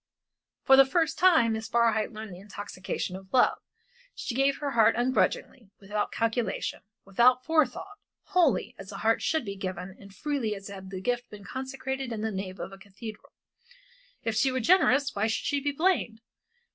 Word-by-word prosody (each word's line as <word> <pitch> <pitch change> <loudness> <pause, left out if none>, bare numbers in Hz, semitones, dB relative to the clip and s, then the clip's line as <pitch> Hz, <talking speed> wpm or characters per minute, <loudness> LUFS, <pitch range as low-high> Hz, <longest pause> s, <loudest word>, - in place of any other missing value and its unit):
For 270 - +7
the 270 - +10
first 325 +2 0
time 320 -11 +5
Miss 220 0 -4
Barhyte 230 -2 +2
learned 215 -3 -8
the 175 - -10
intoxication 195 -2 -5
of 190 0 -11
love. 255 - +4 0.6
She - - -4
gave 275 +2 +2
her 285 -1 -3
heart 225 -4 +4
ungrudgingly, 245 -2 0
without 205 +1 -2
calculation, 230 0 -1 0.2
without 245 +6 +4
forethought, 325 +6 0 0.2
wholly, 315 - +2
as 195 +1 -9
a 195 - -7
heart 225 +2 +2
should 315 -5 0
be 200 -1 -5
given 185 -1 -5
and 200 0 -13
freely 265 -3 -2
as 195 0 -9
had 190 -1 -9
the 190 -1 -6
gift 245 +3 -2
been 210 -1 -11
consecrated 265 +1 -5
in 220 -2 -4
the 220 0 -1
nave 190 -1 -5
of - - -5
a 195 - -12
cathedral. 210 +2 -10 0.9
If 225 - -1
she 260 +4 +3
were 260 - -1
generous 280 -2 +4
why 205 +2 0
should 225 - -2
she 285 - +1
be 285 +1 -1
blamed? 300 -8 +1
230 Hz, 180 wpm, -28 LUFS, 200-270 Hz, 0.9 s, the